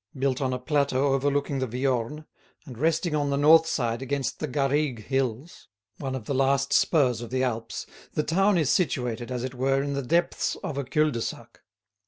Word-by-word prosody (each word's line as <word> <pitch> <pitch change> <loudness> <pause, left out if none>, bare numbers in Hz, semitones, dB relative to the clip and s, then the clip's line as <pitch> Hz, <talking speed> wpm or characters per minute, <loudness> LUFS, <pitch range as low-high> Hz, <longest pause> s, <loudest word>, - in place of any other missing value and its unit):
Built 135 0 0
on 130 -1 0
a 125 - -1
plateau 140 0 +1
overlooking 140 0 0
the 130 - -1
Viorne, 130 +4 -2 0.4
and 130 -5 -9
resting 160 +5 0
on 145 -1 0
the 140 - 0
north 160 +3 +6
side 120 -5 -1
against 135 -1 -2
the 155 - -2
Garrigues 135 -3 0
hills, 135 +4 -3 0.3
one 135 -2 -3
of 125 -5 -6
the 140 - -2
last 135 +1 +2
spurs 130 -8 +3
of 120 - -7
the 130 0 0
Alps, 115 -3 -3 0.3
the 150 - 0
town 195 +5 +2
is 155 -5 +2
situated, 125 -8 0
as 125 -1 -3
it 130 0 -4
were, 135 +2 +1
in 140 0 -2
the 140 - -1
depths 170 +7 0
of 140 -2 -3
a - - -1
cul 150 +4 +1
de 120 -3 -3
sac. - - -7
135 Hz, 200 wpm, -26 LUFS, 125-150 Hz, 0.4 s, north